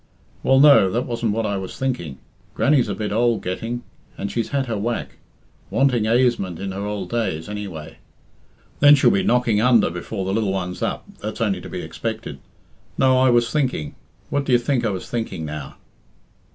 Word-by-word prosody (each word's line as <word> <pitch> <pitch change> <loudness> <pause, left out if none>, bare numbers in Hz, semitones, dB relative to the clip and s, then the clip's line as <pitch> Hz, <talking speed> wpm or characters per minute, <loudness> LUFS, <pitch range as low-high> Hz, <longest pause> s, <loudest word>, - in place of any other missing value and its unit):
"Well, 135 0 +4
no, 140 -9 +7
that 120 +6 -1
wasn't 115 -3 -1
what 115 +1 -1
I 100 -1 -1
was 95 -1 -6
thinking. 125 - -3 0.4
Grannie's 135 -5 +3
a 100 - -2
bit 105 -1 -3
ould 115 0 +1
getting 115 +7 -4 0.3
and 100 - -4
she's 115 -2 -2
had 140 -1 0
her 115 -3 -3
whack. 115 +4 -3 0.5
Wanting 125 -5 +2
aisement 115 -7 +1
in 95 +1 -4
her 100 +1 -4
ould 100 -3 -4
days, 105 -9 -2
anyway. 100 -7 -7 0.8
Then 145 0 +8
she'll 140 - +4
be 195 - +2
knocking 125 - +2
under 120 -7 +4
before 95 +3 -5
the 95 - -1
lil 105 -2 0
one's 90 -2 -3
up - - -2
that's 110 +3 -5
only 100 -6 0
to - - -9
be - - -5
expected. - - -5 0.6
No, 130 -1 +4
I 130 0 +4
was 120 -1 +3
thinking 130 - -1 0.4
what 145 -1 0
d'ye 125 -2 +4
think 120 +1 0
I 115 - +1
was 95 -2 -5
thinking 110 -9 -4
now?" 75 -2 -7
115 Hz, 185 wpm, -22 LUFS, 95-125 Hz, 0.8 s, Then